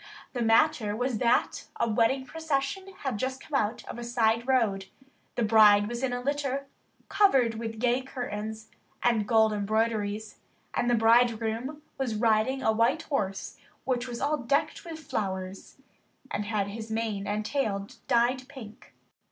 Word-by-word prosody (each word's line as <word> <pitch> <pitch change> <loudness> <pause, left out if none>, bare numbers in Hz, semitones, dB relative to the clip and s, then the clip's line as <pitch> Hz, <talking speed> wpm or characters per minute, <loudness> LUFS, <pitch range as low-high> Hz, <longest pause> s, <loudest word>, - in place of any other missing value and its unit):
The 245 - -2
matter 225 -1 +3
was 245 -1 -1
that 235 -1 +1
a - - +2
wedding 230 +4 +2
procession 320 +6 -2
had 260 -7 -2
just 260 +2 -2
come 305 - -15
out 225 -4 0
of - - -7
a - - -5
side 235 0 +1
road. 210 -7 +1 0.5
The 240 - 0
bride 210 -2 +6
was 240 +2 -4
in 265 -2 0
a 245 - -2
litter 275 0 -1 0.4
covered 265 - +4
with 225 -1 -5
gay 245 +2 +2
curtains 220 -4 -6 0.3
and 225 -4 +2
gold 220 -1 +4
embroideries, 215 0 -1 0.3
and 240 - 0
the 240 - +4
bridegroom 230 +4 +2 0.2
was 250 -5 -1
riding 225 +4 +2
a 220 - +4
white 235 +8 +2
horse 195 -9 -3 0.3
which 250 -1 -1
was 240 -1 -5
all 295 +2 +1
decked 280 +3 0
with 335 -3 -7
flowers, 190 -10 -5 0.5
and 210 - -2
had 205 -2 -1
his 220 +2 -7
mane 220 -3 -2
and 210 +1 -2
tail 210 -7 -1 0.2
dyed 250 +2 +2
pink. 225 -6 -12
235 Hz, 155 wpm, -28 LUFS, 215-265 Hz, 0.5 s, bride